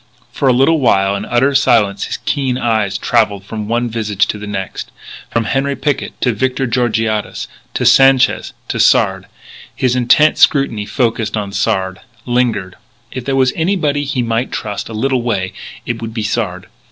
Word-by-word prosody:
For 140 - -1
a - - +6
little 135 +6 +3
while, 100 -6 +2
in 100 - -4
utter 135 +4 +2
silence, 115 -8 +2
his 120 - -4
keen 135 -4 0
eyes 110 -5 0
travelled 105 -3 +1
from 105 0 -5
one 120 +2 0
visage 105 -3 0
to 105 - -3
the 105 - -7
next, 95 -2 -5 0.4
from 115 - 0
Henri 135 +5 -1
Picquet 140 +1 -2
to 125 - +2
Victor 130 +4 -1
Georgiades, 115 -3 -1 0.3
to - - -1
Sanchez, 135 -1 +4 0.2
to - - -2
Sard. 95 0 +3 0.5
His 125 -1 +1
intent 130 +5 +4
scrutiny 115 -8 +3
focussed 115 -4 -1
on 100 -2 -3
Sard; 95 -2 -1 0.3
lingered. 120 -7 -1 0.3
If 130 -2 -6
there 135 - 0
were 135 -1 +4
anybody 160 -5 0
he 135 -3 -1
might 115 +2 -1
trust, 105 -1 -4
a - - -7
little 130 +3 0
way, 100 -6 -2 0.3
it 120 -1 -3
would 115 0 -6
be 110 - -2
Sard. 100 -4 -2
115 Hz, 170 wpm, -16 LUFS, 105-130 Hz, 0.5 s, a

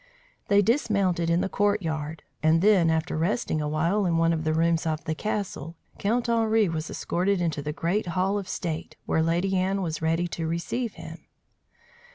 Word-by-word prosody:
They 205 0 +4
dismounted 200 - +1
in 170 +1 +3
the - - 0
courtyard, 165 -7 -1 0.2
and 160 +3 +3
then, 195 -6 +5
after 160 +1 0
resting 160 -1 0
awhile 165 +7 +1
in 165 -1 +1
one 165 0 +3
of 160 -1 -2
the 155 - +2
rooms 165 0 +2
of 155 -1 -2
the 160 - -2
castle, 185 -4 -4 0.2
Count 235 +4 0
Henri 225 -2 +3
was 160 -1 -3
escorted 190 +2 0
into 165 -4 -1
the 150 +1 -3
great 175 +6 -1
hall 190 +3 0
of 195 - -8
state, 160 -3 -4
where 160 - +1
Lady 175 +4 +1
Anne 190 +1 0
was 160 -2 -3
ready 165 +2 +1
to 165 -1 -3
receive 205 +8 -2
him. - - -10
170 Hz, 180 wpm, -26 LUFS, 160-200 Hz, 0.2 s, then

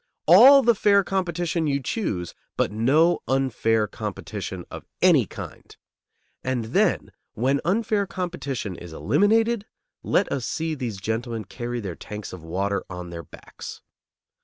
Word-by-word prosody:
All 260 - +9
the 235 0 +5
fair 200 -1 +4
competition 175 -4 -1
you 140 -1 +1
choose, 120 - -3 0.2
but - - +1
no 145 +11 +3
unfair 115 -4 +1
competition - - -6
of - - -7 0.2
any - - +5
kind. - - -10 0.7
And 125 -3 -1
then - - +2 0.2
when 135 +5 +1
unfair 205 +3 +1
competition 140 - -4
is 85 -2 -10
eliminated, 220 - +2 0.3
let - - +1
us 130 -4 -2
see 160 0 -2
these 125 -8 -4
gentlemen 110 +2 -3
carry 120 -1 -5
their 95 -4 -4
tanks 105 +1 -8
of 90 - -8
water 100 +4 -2
on 90 -1 -7
their 85 -1 -6
backs. 75 - -11
135 Hz, 135 wpm, -24 LUFS, -, 0.7 s, All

